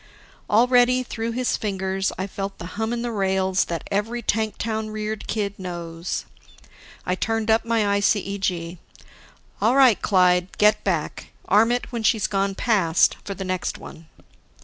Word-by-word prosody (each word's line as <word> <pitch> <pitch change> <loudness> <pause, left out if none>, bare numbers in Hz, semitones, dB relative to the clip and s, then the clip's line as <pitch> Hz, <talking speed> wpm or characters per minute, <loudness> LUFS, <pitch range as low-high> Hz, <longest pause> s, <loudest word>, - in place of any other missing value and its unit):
Already, 245 +3 +4
through 230 -1 -4
his 250 +1 0
fingers, 190 -2 -2
I 185 - -2
felt 195 0 -5
the 170 - -8
hum 220 +2 -2
in 240 0 -2
the 240 - -2
rails 190 -2 +1
that 170 -1 -5
every 225 +4 -1
tank 220 0 -1
town 220 -1 -3
reared 215 0 -4
kid 205 -2 -2
knows. 170 -2 -5 0.8
I 180 - 0
turned 225 +3 -1
up 225 +1 +2
my 230 -1 +1 0.2
ICEG. 195 -4 -1 0.8
"All 240 +4 +3
right, 260 -6 +5
Clyde, 180 -2 +2
get 210 0 +4
back. 170 -6 -2 0.2
Arm 220 +4 +4
it 245 +1 -2
when 235 -2 -3
she's 220 -1 +2
gone 195 -1 0
past, 190 -9 +2
for 200 - -5
the 190 +1 -5
next 185 -1 -2
one." 160 0 -12
205 Hz, 155 wpm, -23 LUFS, 190-225 Hz, 0.8 s, right